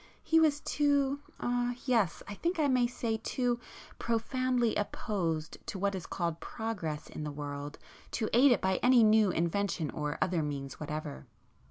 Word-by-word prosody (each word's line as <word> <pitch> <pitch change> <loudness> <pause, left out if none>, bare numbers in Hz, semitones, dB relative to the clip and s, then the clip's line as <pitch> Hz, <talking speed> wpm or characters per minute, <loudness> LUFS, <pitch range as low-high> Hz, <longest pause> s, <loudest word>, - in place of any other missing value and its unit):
He 325 - +4
was 300 -2 +3
too,—er—yes, 255 - 0
I 205 - -5
think 340 - -1
I 305 -2 +3
may 250 -3 +3
say 230 -2 -2
too 240 +2 -1 0.4
profoundly 245 +1 +1
opposed 175 -7 -2
to 205 - -4
what 200 +1 0
is 185 -3 -5
called 170 -2 -2
'progress' 185 -10 -4
in 155 - -6
the 150 - -3
world 145 0 -6
[p - - -29 0.3
49] - - -30
to 220 - -1 0.2
aid 280 - +8
it 240 - +3
by 190 0 +1
any 250 -2 +6
new 215 -1 +5
invention 170 -1 0
or 150 -1 -3
other 175 -3 +1
means 140 -2 -4
whatever. 150 - -5
215 Hz, 165 wpm, -31 LUFS, 160-245 Hz, 0.4 s, aid